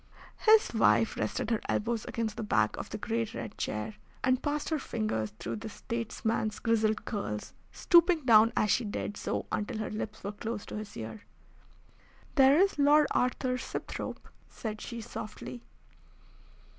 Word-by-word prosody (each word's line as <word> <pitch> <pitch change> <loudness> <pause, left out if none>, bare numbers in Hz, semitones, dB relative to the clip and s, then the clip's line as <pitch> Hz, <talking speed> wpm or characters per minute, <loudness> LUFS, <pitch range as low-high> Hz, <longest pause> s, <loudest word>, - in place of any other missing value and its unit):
His 435 - +6
wife 115 - +4
rested 110 - -2
her 225 - +1
elbows 230 +1 0
against 225 -2 -2
the 230 - -4
back 110 - +2
of - - -6
the - - -4
great 225 +1 -2
red 115 -3 -6
chair, 105 0 -3 0.3
and 255 0 +3
passed 295 0 -1
her 315 -2 0
fingers 215 - -2
through - - -4
the 220 +1 -6
statesman's 225 -1 -2
grizzled 220 -2 +1
curls, 105 - -4 0.2
stooping 340 -3 +4
down 225 -1 +7
as 210 - +3
she 245 - +3
did 205 -1 -3
so - - -2
until 215 +2 -2
her 215 - -3
lips 215 0 -5
were 200 - -3
close 215 +1 -5
to - - -6
his 210 -1 -7
ear. 115 - -6 1.1
"There 275 0 +6
is 390 -5 +3
Lord 295 +1 +6
Arthur 250 0 +1
Sibthorpe," - - -5 0.2
said 215 -3 -5
she 235 -1 -6
softly. 225 +1 -7
225 Hz, 155 wpm, -30 LUFS, 210-250 Hz, 1.1 s, down